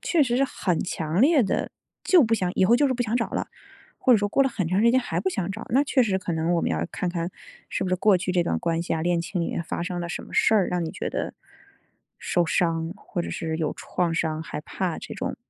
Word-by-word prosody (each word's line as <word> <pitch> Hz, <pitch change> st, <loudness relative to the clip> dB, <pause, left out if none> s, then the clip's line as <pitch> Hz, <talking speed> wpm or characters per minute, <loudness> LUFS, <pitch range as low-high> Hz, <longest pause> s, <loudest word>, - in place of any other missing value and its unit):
确 335 Hz, -4 st, +2 dB
实 245 Hz, -3 st, +1 dB
是 275 Hz, -, +3 dB
很 185 Hz, -9 st, -1 dB
强 160 Hz, 0 st, -2 dB
烈 285 Hz, +1 st, +5 dB
的， 195 Hz, -, -1 dB, 0.3 s
就 360 Hz, -4 st, +6 dB
不 225 Hz, 0 st, +2 dB
想 185 Hz, -5 st, 0 dB
以 185 Hz, -, +3 dB
后 230 Hz, -, +5 dB
就 285 Hz, +4 st, +4 dB
是 260 Hz, -, 0 dB
不 245 Hz, -, 0 dB
想 230 Hz, 0 st, -2 dB
找 230 Hz, -, -1 dB
啦， -, -, -3 dB, 0.5 s
或 255 Hz, -, +4 dB
者 -, -, +7 dB
说 205 Hz, -1 st, 0 dB
过 275 Hz, -, +3 dB
了 270 Hz, -, +2 dB
很 200 Hz, -8 st, -2 dB
长 185 Hz, +4 st, +1 dB
时 235 Hz, +2 st, +5 dB
间 255 Hz, -, +4 dB
还 175 Hz, -9 st, -2 dB
不 190 Hz, -, 0 dB
想 190 Hz, 0 st, -2 dB
找， 220 Hz, +3 st, -7 dB
那 270 Hz, +5 st, +4 dB
确 270 Hz, -2 st, +3 dB
实 205 Hz, -5 st, +1 dB
可 185 Hz, -2 st, -4 dB
能 165 Hz, +2 st, 0 dB
我 170 Hz, -, +2 dB
们 -, -, 0 dB
要 80 Hz, 0 st, -1 dB
看 180 Hz, -, -2 dB
看， 170 Hz, 0 st, -3 dB, 0.4 s
是 -, -, -2 dB
不 185 Hz, -, -2 dB
是 185 Hz, -, +2 dB
过 200 Hz, +1 st, +4 dB
去 185 Hz, 0 st, -2 dB
这 180 Hz, -1 st, +3 dB
段 170 Hz, -, -1 dB
关 165 Hz, -1 st, -1 dB
系 170 Hz, -, -2 dB
啊， 160 Hz, -, -2 dB
恋 175 Hz, 0 st, +1 dB
情 180 Hz, +2 st, -3 dB
里 170 Hz, -, -1 dB
面 -, -, -2 dB
发 170 Hz, -, -4 dB
生 175 Hz, 0 st, -3 dB
了 170 Hz, -, -4 dB
什 170 Hz, -, -4 dB
么 -, -, -13 dB
事 220 Hz, -, +4 dB
儿， 200 Hz, -4 st, +3 dB
让 180 Hz, -1 st, -1 dB
你 160 Hz, -, -3 dB
觉 -, -, -4 dB
得 -, -, -3 dB, 0.8 s
受 175 Hz, -1 st, 0 dB
伤， 165 Hz, -1 st, 0 dB
或 200 Hz, -3 st, -5 dB
者 -, -, -5 dB
是 160 Hz, -1 st, -3 dB
有 160 Hz, -2 st, -1 dB
创 175 Hz, -2 st, -2 dB
伤 160 Hz, -1 st, -1 dB
害 155 Hz, -, -6 dB
怕 175 Hz, +1 st, -3 dB
这 -, -, -8 dB
种。 260 Hz, +1 st, -3 dB
185 Hz, 300 characters per minute, -25 LUFS, 170-230 Hz, 0.8 s, 者